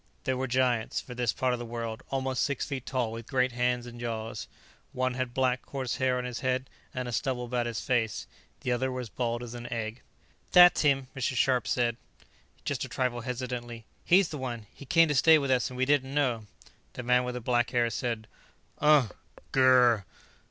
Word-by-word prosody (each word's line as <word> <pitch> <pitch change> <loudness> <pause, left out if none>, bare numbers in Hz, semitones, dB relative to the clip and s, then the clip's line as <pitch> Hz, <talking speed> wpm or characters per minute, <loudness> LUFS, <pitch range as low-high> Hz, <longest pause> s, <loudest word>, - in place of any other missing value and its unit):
They 130 - 0
were 130 +1 -2
giants, 125 -3 +1
for 125 - -9
this 120 -2 0
part 130 -1 0
of 125 - -2
the - - -4
world, 115 -1 -5
almost 130 -1 -1
six 140 -2 0
feet 135 -3 -5
tall, 125 -4 -1
with 115 0 -7
great 130 -2 +2
hands 125 0 0
and 120 0 -10
jaws. 115 -1 -4 0.5
One 130 0 0
had 130 -1 -2
black, 130 0 +1
coarse 130 -3 -4
hair 130 -1 +1
on 125 - -2
his 125 -2 -4
head 130 0 -1 0.2
and 125 -1 -4
a - - -4
stubble 125 +1 -1
about 120 0 -1
his 115 -1 -3
face; 115 -5 0 0.4
the 125 - -1
other 130 +2 0
was 125 -3 -5
bald 120 0 -2
as 120 -1 -7
an 120 0 -7
egg. 115 0 -4 0.5
"That's 180 -1 +8
him," 135 -3 +2
Mrs. 135 -1 -1
Scharpe 125 -2 +2
said 120 -2 +1 0.7
just - - -1
a - - -6
trifle 125 -2 -1
hesitantly. 120 -2 -5 0.2
"He's 185 0 +4
the 150 - -6
one. 120 -4 -5
He 140 - -12
came 165 +2 +5
to 150 - 0
stay 160 +4 +6
with 140 -3 -1
us 130 0 +2
and 125 - -9
we 130 - +2
didn't 140 -1 +1
know 120 -7 0 0.2
" - - -34
The 125 - -6
man 125 +1 +3
with 125 -1 -4
black 120 0 +2
hair 120 -1 +1
said: 115 -1 -3 0.5
"Uh. 150 -6 +5 0.4
Gur." 125 -5 +5
125 Hz, 205 wpm, -29 LUFS, 120-130 Hz, 0.7 s, That's